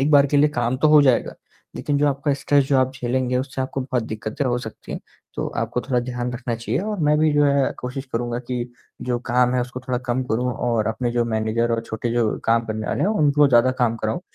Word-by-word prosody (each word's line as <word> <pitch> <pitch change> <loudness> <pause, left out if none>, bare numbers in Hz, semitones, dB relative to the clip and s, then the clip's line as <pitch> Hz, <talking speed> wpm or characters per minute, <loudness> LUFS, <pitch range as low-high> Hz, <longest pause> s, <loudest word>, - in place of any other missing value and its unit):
एक 140 +3 +2
बार 145 -2 +6
के 145 - 0
लिए 150 +1 +5
काम 120 -2 -1
तो 155 +4 +3
हो 150 0 +7
जाएगा। 130 -4 +2 0.4
लेकिन 145 -1 -1
जो 145 - +3
आपका 140 +1 0
स्ट्रेस 140 0 +2
जो 140 - +3
आप 130 0 +1
झेलेंगे 125 0 -1
उससे 130 0 -4
आपको 135 +1 -3
बहुत 130 -2 -1
दिक्कतें 110 +5 -4
हो 120 -2 +1
सकती 110 -3 -9
हैं। - - -5 0.3
तो - - -2
आपको 125 - -1
थोड़ा 125 -1 0
ध्यान 120 0 -4
रखना 120 -1 -3
चाहिए 115 +5 -2
और 210 0 -3
मैं 150 0 +4
भी 155 0 +3
जो 145 0 +4
है 140 -1 +2
कोशिश 130 +2 -5
करूँगा 120 +1 -2
कि 125 -1 -2 0.4
जो 125 -1 -1
काम 125 0 +3
है 125 - +2
उसको 125 +1 -5
थोड़ा 125 -1 0
कम 125 +2 0
करूँ 125 +1 -1
और 115 -3 0
अपने 120 +2 -1
जो 120 -1 +1
मैनेजर 115 +1 0
और 115 - 0
छोटे 115 +2 -3
जो 115 -3 +1
काम 115 0 +2
करने 110 -1 -4
वाले - - -2
हैं - - +2
उनको 150 -7 +3
ज़्यादा 125 +1 +5
काम 115 -1 +2
कराऊँ 110 +7 -2
125 Hz, 245 wpm, -22 LUFS, 120-140 Hz, 0.4 s, हो